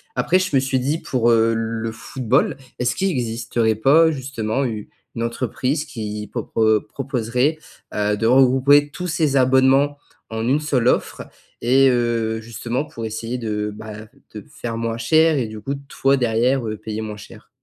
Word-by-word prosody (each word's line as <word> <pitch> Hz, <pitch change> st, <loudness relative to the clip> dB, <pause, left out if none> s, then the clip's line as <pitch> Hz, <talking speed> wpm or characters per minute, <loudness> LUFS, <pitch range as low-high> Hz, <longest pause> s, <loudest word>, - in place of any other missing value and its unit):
Après, 185 Hz, -, +2 dB
je 185 Hz, -6 st, -1 dB
me -, -, +6 dB
suis 130 Hz, -1 st, 0 dB
dit: 140 Hz, +5 st, 0 dB
«Pour, 120 Hz, -2 st, +1 dB
heu, 115 Hz, 0 st, +3 dB
le 115 Hz, 0 st, -3 dB
football, 120 Hz, +2 st, 0 dB, 0.2 s
est-ce 125 Hz, 0 st, 0 dB
qu'il 195 Hz, -, 0 dB
existerait 115 Hz, -4 st, -1 dB
pas, 155 Hz, +9 st, +5 dB
justement, 130 Hz, -3 st, -2 dB
une 110 Hz, -5 st, -4 dB, 0.4 s
entreprise 130 Hz, +5 st, -2 dB
qui 105 Hz, -7 st, -6 dB
propro 110 Hz, -2 st, +1 dB
proposerait, 125 Hz, +3 st, -1 dB, 0.4 s
heu, 105 Hz, 0 st, 0 dB
de 110 Hz, -, -2 dB
regrouper 135 Hz, +4 st, +5 dB
tous 180 Hz, +4 st, -5 dB
ces 160 Hz, -4 st, 0 dB
abonnements 130 Hz, +2 st, +4 dB, 0.3 s
en 110 Hz, +1 st, -3 dB
une 145 Hz, +4 st, +2 dB
seule 130 Hz, -5 st, 0 dB
offre?» -, -, 0 dB, 0.4 s
et 135 Hz, +3 st, +4 dB
heu, 115 Hz, -2 st, 0 dB
justement, 115 Hz, +5 st, -4 dB
pour 145 Hz, -7 st, -9 dB
essayer 115 Hz, +3 st, -4 dB
de, 105 Hz, -2 st, -3 dB
bah, 110 Hz, 0 st, -9 dB, 0.3 s
de 105 Hz, -, -7 dB
faire 115 Hz, -1 st, -5 dB
moins 115 Hz, 0 st, -2 dB
cher, 155 Hz, +6 st, +3 dB
et 120 Hz, -, -1 dB
du 110 Hz, 0 st, -8 dB
coup, 135 Hz, +6 st, -4 dB
toi, 135 Hz, +1 st, +2 dB
derrière, 125 Hz, +1 st, +1 dB
heu, 110 Hz, -1 st, -4 dB
payer 110 Hz, +1 st, -5 dB
moins 105 Hz, -1 st, -6 dB
cher? 105 Hz, -, -14 dB
120 Hz, 165 wpm, -21 LUFS, 110-135 Hz, 0.4 s, me